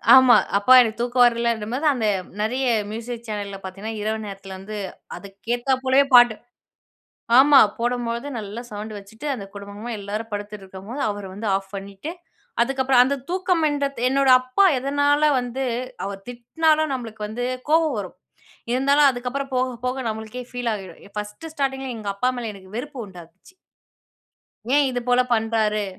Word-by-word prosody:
ஆமா. 260 Hz, -2 st, +8 dB, 0.2 s
அப்பா 205 Hz, +6 st, +5 dB
எனக்கு 225 Hz, -1 st, -1 dB
தூக்கம் 245 Hz, +1 st, +3 dB
வரலன்றம் 235 Hz, -2 st, 0 dB
போது, 285 Hz, +5 st, -2 dB
அந்த 240 Hz, -4 st, -2 dB, 0.4 s
நெறைய 250 Hz, +5 st, 0 dB, 0.3 s
மியூசிக் 235 Hz, +1 st, -6 dB
சேனல்ல 205 Hz, -2 st, -4 dB
பார்த்தீங்கன்னா, 195 Hz, +4 st, -6 dB
இரவு 220 Hz, +1 st, -1 dB
நேரத்துல 195 Hz, -1 st, -8 dB
வந்து 210 Hz, +3 st, -7 dB, 0.4 s
அதுக்கேத்தா 235 Hz, +6 st, -2 dB
போலவே 265 Hz, +2 st, +5 dB
பாட்டு 240 Hz, -2 st, +7 dB, 1.0 s
ஆமா. 280 Hz, +1 st, +8 dB, 0.2 s
போடும்போது 240 Hz, +1 st, -2 dB
நல்லா 210 Hz, +2 st, -6 dB
சவுண்டு 210 Hz, +1 st, -6 dB
வச்சுட்டு, 220 Hz, +8 st, -9 dB
அந்த 200 Hz, -5 st, -7 dB
குடும்பமா 200 Hz, +3 st, -7 dB
எல்லாரும் 210 Hz, +3 st, -5 dB
படுத்துட்ருக்கும்போது 205 Hz, +3 st, -7 dB
அவரு 205 Hz, -1 st, -5 dB
வந்து 210 Hz, +3 st, -5 dB
ஆஃப் 195 Hz, 0 st, -4 dB
பண்ணீட்டு. 195 Hz, +9 st, -7 dB, 0.5 s
அதுக்கப்புறம், 265 Hz, 0 st, +3 dB
அந்த 275 Hz, +3 st, 0 dB
தூக்கம் 365 Hz, -2 st, +1 dB
என்றத்து 280 Hz, -4 st, -2 dB
என்னோட 275 Hz, 0 st, +2 dB
அப்பா 255 Hz, +10 st, +2 dB
எதனால 285 Hz, +3 st, +2 dB
வந்து 245 Hz, +2 st, -4 dB, 0.4 s
அவர் 195 Hz, 0 st, -6 dB
திட்னாலும், 310 Hz, +6 st, +1 dB
நம்பளுக்கு 225 Hz, -4 st, -5 dB
வந்து 235 Hz, +3 st, -4 dB, 0.2 s
கோவம் 315 Hz, -3 st, +3 dB
வரும். 185 Hz, -3 st, -7 dB, 0.6 s
இருந்தாலும் 280 Hz, +3 st, +4 dB
அதுக்கப்புறம், 260 Hz, +2 st, -4 dB
போக 255 Hz, -1 st, 0 dB
போக 260 Hz, +1 st, -2 dB
நம்மளுக்கே 220 Hz, +3 st, -5 dB
ஃபீல் 245 Hz, -1 st, -2 dB
ஆகிடும். 190 Hz, -5 st, -9 dB, 0.2 s
1 210 Hz, +10 st, -6 dB
ஸ்டார்டிங்கில 270 Hz, -3 st, -2 dB
எங்க 205 Hz, -2 st, -4 dB
அப்பா 250 Hz, +6 st, +1 dB
மேல 230 Hz, -2 st, -4 dB
எனக்கு 190 Hz, 0 st, -14 dB
வெறுப்பு 265 Hz, +2 st, -6 dB
உண்டாக்குச்சு. 180 Hz, -, -15 dB, 1.2 s
ஏன் 290 Hz, -1 st, +5 dB
இது 245 Hz, -, -1 dB
போல 245 Hz, 0 st, +5 dB
பண்றாரு? 220 Hz, -2 st, +1 dB
235 Hz, 145 wpm, -23 LUFS, 210-265 Hz, 1.2 s, ஆமா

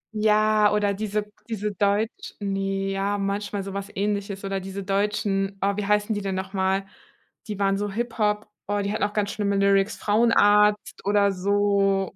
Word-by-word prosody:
Ja, 215 Hz, 0 st, +3 dB
oder 205 Hz, -1 st, +1 dB
diese 210 Hz, 0 st, -3 dB, 0.2 s
diese 210 Hz, -2 st, -2 dB
Deutsch 205 Hz, +3 st, -1 dB
ne, 195 Hz, -1 st, -2 dB
ja, 195 Hz, +1 st, -1 dB
manchmal 200 Hz, 0 st, -2 dB
so 195 Hz, 0 st, -7 dB
was 200 Hz, 0 st, -5 dB
Ähnliches 200 Hz, 0 st, -2 dB
oder 195 Hz, 0 st, -2 dB
diese 195 Hz, +1 st, -6 dB
Deutschen. 195 Hz, 0 st, 0 dB
Oh, 200 Hz, 0 st, +1 dB
wie 205 Hz, -1 st, -3 dB
heißen 210 Hz, +1 st, +2 dB
die 205 Hz, -, -3 dB
denn 195 Hz, -1 st, -2 dB
noch 190 Hz, +1 st, -5 dB
mal? 190 Hz, 0 st, 0 dB, 0.6 s
Die 210 Hz, -2 st, -4 dB
waren 195 Hz, -1 st, +1 dB
so 205 Hz, -, -2 dB
Hip 230 Hz, +3 st, -4 dB
Hop 210 Hz, 0 st, +1 dB, 0.2 s
oh, 205 Hz, 0 st, 0 dB
die 200 Hz, +1 st, -2 dB
hatten -, -, -1 dB
auch 205 Hz, -, +1 dB
ganz 205 Hz, -2 st, 0 dB
schlimme 200 Hz, -1 st, -1 dB
Lyrics, 200 Hz, 0 st, +2 dB
Frauenarzt 210 Hz, -1 st, +3 dB
oder 200 Hz, 0 st, +3 dB
so. 195 Hz, 0 st, +1 dB
200 Hz, 180 wpm, -24 LUFS, 195-210 Hz, 0.6 s, Ja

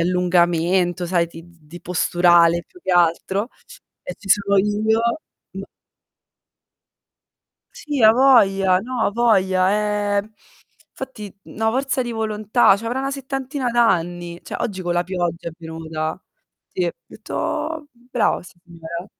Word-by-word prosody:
allungamento, 175 Hz, 0 st, +1 dB
sai 170 Hz, -1 st, +1 dB
di 165 Hz, 0 st, -12 dB
di 170 Hz, 0 st, -15 dB
posturale 175 Hz, -1 st, +3 dB
più 360 Hz, -, -19 dB
che -, -, -2 dB
altro, 180 Hz, +5 st, +1 dB, 0.5 s
e -, -, -7 dB
ci 200 Hz, -, -13 dB
sono 200 Hz, 0 st, +3 dB
io 210 Hz, +3 st, +1 dB, 0.5 s
m -, -, -6 dB, 2.1 s
Sì, 290 Hz, -4 st, -3 dB
avoglia. 215 Hz, -6 st, +5 dB
No, 250 Hz, +3 st, -5 dB
avoglia. 205 Hz, -1 st, +1 dB
Eh, -, -, +4 dB, 0.7 s
'nfatti 215 Hz, -7 st, -9 dB
na' 220 Hz, +1 st, -2 dB
forza 265 Hz, +2 st, -1 dB
di 240 Hz, -1 st, -5 dB
volontà, 215 Hz, -1 st, +2 dB
c'avrà 230 Hz, +4 st, -4 dB
una 270 Hz, +1 st, -2 dB
settantina 270 Hz, -1 st, -4 dB
d'anni. 175 Hz, -7 st, 0 dB
Cioè -, -, -6 dB
oggi 190 Hz, -4 st, -3 dB
con 175 Hz, -1 st, -1 dB
la 175 Hz, 0 st, +1 dB
pioggia 175 Hz, -2 st, -3 dB
è -, -, -9 dB
venuta. 160 Hz, 0 st, -5 dB, 0.5 s
Sì, 180 Hz, -, -2 dB
ho 170 Hz, -, -1 dB
detto: 315 Hz, -1 st, -4 dB, 0.2 s
"Brava 245 Hz, -, +1 dB
signora" 170 Hz, -1 st, -10 dB
190 Hz, 120 wpm, -21 LUFS, 175-225 Hz, 2.1 s, avoglia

